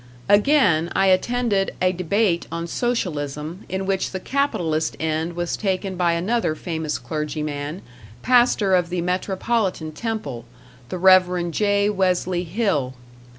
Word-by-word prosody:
Again, 205 Hz, -, +4 dB
I 195 Hz, -, +3 dB
attended 205 Hz, +1 st, +1 dB
a 185 Hz, 0 st, +3 dB
debate 185 Hz, +1 st, 0 dB
on 170 Hz, 0 st, -3 dB
Socialism, 165 Hz, -, -3 dB
in 190 Hz, 0 st, -2 dB
which 190 Hz, -1 st, 0 dB
the 190 Hz, -, -5 dB
capitalist 175 Hz, -, -1 dB
end 160 Hz, +1 st, -1 dB
was 175 Hz, 0 st, -2 dB
taken 190 Hz, -1 st, -2 dB
by 175 Hz, -1 st, +2 dB
another 180 Hz, 0 st, 0 dB
famous 160 Hz, -5 st, -3 dB
clergyman, 150 Hz, +4 st, -4 dB, 0.4 s
pastor 240 Hz, -5 st, +3 dB
of 175 Hz, -2 st, +2 dB
the 180 Hz, -1 st, -2 dB
Metropolitan 185 Hz, -1 st, -1 dB
Temple, 155 Hz, -, -5 dB, 0.4 s
the 185 Hz, -, -4 dB
Rev. 180 Hz, -1 st, +4 dB
J. 205 Hz, +2 st, +2 dB
Wesley 185 Hz, -2 st, 0 dB
Hill. 170 Hz, -, -1 dB
180 Hz, 125 wpm, -22 LUFS, 160-200 Hz, 0.4 s, Again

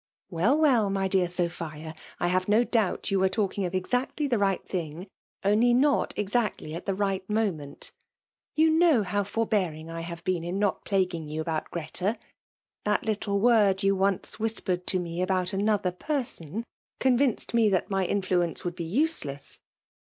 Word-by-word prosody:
Wdl, 195 Hz, -, +2 dB
welL 255 Hz, -10 st, +4 dB
my 195 Hz, 0 st, 0 dB
dear 190 Hz, -2 st, +2 dB
Sophia^ 165 Hz, -3 st, -4 dB, 0.2 s
I 175 Hz, -, +1 dB
have 185 Hz, +1 st, +1 dB
no 215 Hz, +4 st, +4 dB
doabt 220 Hz, -7 st, 0 dB
yoa 195 Hz, -, +2 dB
were 190 Hz, 0 st, +3 dB
talldng 200 Hz, -2 st, -1 dB
of 175 Hz, -, -8 dB
ezacily 250 Hz, +10 st, -1 dB
the 240 Hz, -5 st, +1 dB
right; 195 Hz, -2 st, 0 dB
thing, 170 Hz, -1 st, -4 dB, 0.4 s
only 225 Hz, +4 st, +4 dB
not 280 Hz, +3 st, +2 dB
exactly 210 Hz, -6 st, -1 dB
at 170 Hz, -, -7 dB
the 195 Hz, -, 0 dB
right 195 Hz, -1 st, -1 dB
moment 185 Hz, -10 st, -2 dB, 0.6 s
You 315 Hz, +1 st, +4 dB
know 320 Hz, -8 st, +4 dB
how 200 Hz, +2 st, 0 dB
forhearing 195 Hz, -7 st, -1 dB
I 165 Hz, 0 st, -5 dB
have 170 Hz, 0 st, -7 dB
been 180 Hz, -3 st, -1 dB
in 175 Hz, +3 st, -3 dB
not 205 Hz, -1 st, 0 dB
plaguing 180 Hz, -5 st, 0 dB
you 155 Hz, +1 st, -4 dB
about 160 Hz, 0 st, -2 dB
Greta; 180 Hz, +6 st, -2 dB, 0.4 s
— -, -, -66 dB
^that -, -, +2 dB
little 205 Hz, -2 st, -1 dB
word 205 Hz, -4 st, +4 dB
you 195 Hz, 0 st, +3 dB
onoe 195 Hz, +2 st, -1 dB
whispered 205 Hz, -5 st, -1 dB
to 185 Hz, -, +1 dB
me 175 Hz, -1 st, -3 dB
about 185 Hz, 0 st, 0 dB
another 200 Hz, -1 st, +1 dB
per* 280 Hz, -, -2 dB
son> 195 Hz, 0 st, -5 dB, 0.4 s
ccH^vinced 260 Hz, -2 st, +2 dB
ma 230 Hz, -2 st, +4 dB
that 190 Hz, 0 st, 0 dB
my 195 Hz, -1 st, +1 dB
influence 180 Hz, -3 st, 0 dB
would 175 Hz, -1 st, -2 dB
be 175 Hz, -, -4 dB
useless. 170 Hz, -, -1 dB
195 Hz, 175 wpm, -27 LUFS, 175-220 Hz, 0.6 s, welL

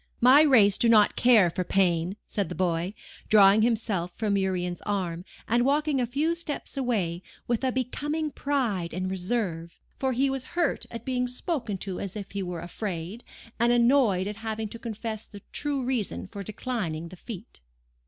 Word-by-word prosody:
"'My 255 Hz, +5 st, +7 dB
race 225 Hz, -10 st, +5 dB
do 235 Hz, -, +4 dB
not 215 Hz, -2 st, +5 dB
care 220 Hz, -8 st, +5 dB
for 185 Hz, -, -2 dB
pain,' 180 Hz, 0 st, +1 dB
said 200 Hz, -5 st, -2 dB
the 180 Hz, -, -5 dB
boy, 180 Hz, +2 st, -1 dB, 0.3 s
drawing 205 Hz, 0 st, +7 dB
himself 215 Hz, -6 st, 0 dB
from 210 Hz, -3 st, 0 dB
Urian's 180 Hz, -2 st, -1 dB
arm, 180 Hz, -4 st, -2 dB, 0.2 s
and 240 Hz, +2 st, +3 dB
walking 290 Hz, 0 st, +2 dB
a 245 Hz, -, 0 dB
few 295 Hz, +7 st, 0 dB
steps 335 Hz, -4 st, -5 dB
away, 205 Hz, -11 st, -1 dB, 0.3 s
with 240 Hz, +1 st, 0 dB
a 260 Hz, -, +2 dB
becoming 295 Hz, +5 st, -2 dB
pride 225 Hz, -, -1 dB
and 185 Hz, +1 st, -2 dB
reserve; 180 Hz, -4 st, -3 dB, 0.2 s
for 265 Hz, -1 st, 0 dB
he 265 Hz, +3 st, +2 dB
was 270 Hz, -1 st, -2 dB
hurt 345 Hz, -, 0 dB
at 230 Hz, -1 st, -8 dB
being 250 Hz, -1 st, 0 dB
spoken 250 Hz, -, -3 dB
to 185 Hz, 0 st, -5 dB
as 195 Hz, 0 st, -5 dB
if 200 Hz, -2 st, -6 dB
he 200 Hz, -, -3 dB
were 180 Hz, -3 st, -4 dB
afraid, 180 Hz, +3 st, -5 dB, 0.4 s
and 235 Hz, +1 st, +4 dB
annoyed 235 Hz, -6 st, +4 dB
at 205 Hz, 0 st, -5 dB
having 220 Hz, -1 st, -4 dB
to 230 Hz, -, -8 dB
confess 220 Hz, -2 st, -5 dB
the 205 Hz, -1 st, -13 dB
true 285 Hz, -3 st, -1 dB
reason 245 Hz, -5 st, -2 dB
for 200 Hz, +1 st, -8 dB
declining 200 Hz, -6 st, -4 dB
the 185 Hz, -, -10 dB
feat. 185 Hz, -, -10 dB
215 Hz, 175 wpm, -27 LUFS, 185-250 Hz, 0.4 s, My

